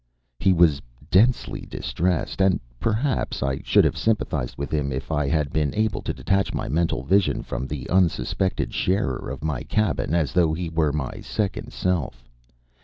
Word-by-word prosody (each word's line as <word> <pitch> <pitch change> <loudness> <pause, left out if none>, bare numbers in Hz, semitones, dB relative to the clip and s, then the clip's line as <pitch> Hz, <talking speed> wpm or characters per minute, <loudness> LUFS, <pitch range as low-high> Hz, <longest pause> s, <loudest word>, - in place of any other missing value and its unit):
He 95 - +4
was 85 -5 +4 0.3
densely 115 +6 +3
distressed 90 +2 -2
and 95 -1 +4 0.2
perhaps 115 - 0
I 65 0 -1
should - - +4
have - - +1
sympathized 75 - -1
with 70 - -4
him 75 -3 0
if 65 +4 -4
I 75 -2 +1
had 75 -1 0
been 75 -3 0
able 110 0 0
to - - -2
detach 95 0 0
my - - -2
mental 80 -2 0
vision 95 +7 +2
from 65 - -4
the 70 -1 -5
unsuspected 90 0 +1
sharer 90 -12 0
of 70 +3 -6
my 75 -6 -1
cabin 105 -6 0
as 80 -5 +1
though 85 -3 +3
he 85 0 -3
were 80 -2 +1
my 70 -3 -4
second 100 -3 -3
self. 70 -10 -2
80 Hz, 170 wpm, -24 LUFS, 70-95 Hz, 0.3 s, He